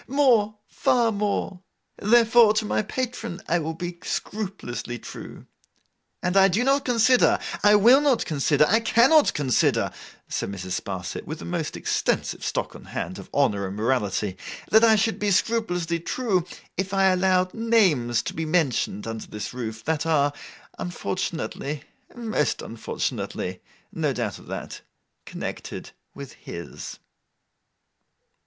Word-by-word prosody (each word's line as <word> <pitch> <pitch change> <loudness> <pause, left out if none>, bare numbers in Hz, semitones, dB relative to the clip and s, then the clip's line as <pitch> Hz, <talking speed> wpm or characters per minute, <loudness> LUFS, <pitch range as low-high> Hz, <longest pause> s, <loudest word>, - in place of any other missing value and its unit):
More, 240 -6 +3
far 235 -2 +2
more. 200 -2 -2 0.4
Therefore, 230 0 +5
to 215 0 +1
my - - +1
patron 230 -3 -4
I 175 - +2
will 160 0 -3
be 175 0 -6
scrupulously 185 - -4
true. - - -10 0.8
And 180 +1 0
I 195 0 +7
do 200 +6 +1
not 275 +2 +2
consider, 245 +1 +4 0.2
I 205 0 +6
will 240 +7 +7
not 280 -5 +2
consider, 150 0 +2
I 220 +4 +4
cannot 245 +7 +4
consider,' 135 -5 +2 0.4
said - - -3
Mrs. 95 -2 -4
Sparsit, 95 -2 -5
with 155 +1 -5
a - - -8
most 170 -3 -3
extensive - - -1
stock - - -2
on - - -12
hand - - -5
of - - -11
honour 100 -1 +1
and 95 - -6
morality, 105 -4 0 0.3
'that 220 +1 +6
I 225 -1 +7
should 220 +2 +1
be 205 - +1
scrupulously 180 -5 0
true, 185 -1 -1 0.3
if 190 +1 -2
I 195 0 +5
allowed 185 0 +2
names 185 - +2
to - - -4
be 160 - -3
mentioned 155 - 0
under 115 -1 -5
this 105 +1 -6
roof, 110 -3 -5
that 160 +1 0
are 145 -3 +2 0.5
unfortunately—most 175 - -3
unfortunately—no 95 -4 -4
doubt - - -3
of - - -16
that—connected - - -8 0.2
with 140 -2 -8
his. 85 0 -8
180 Hz, 135 wpm, -25 LUFS, 140-225 Hz, 0.8 s, I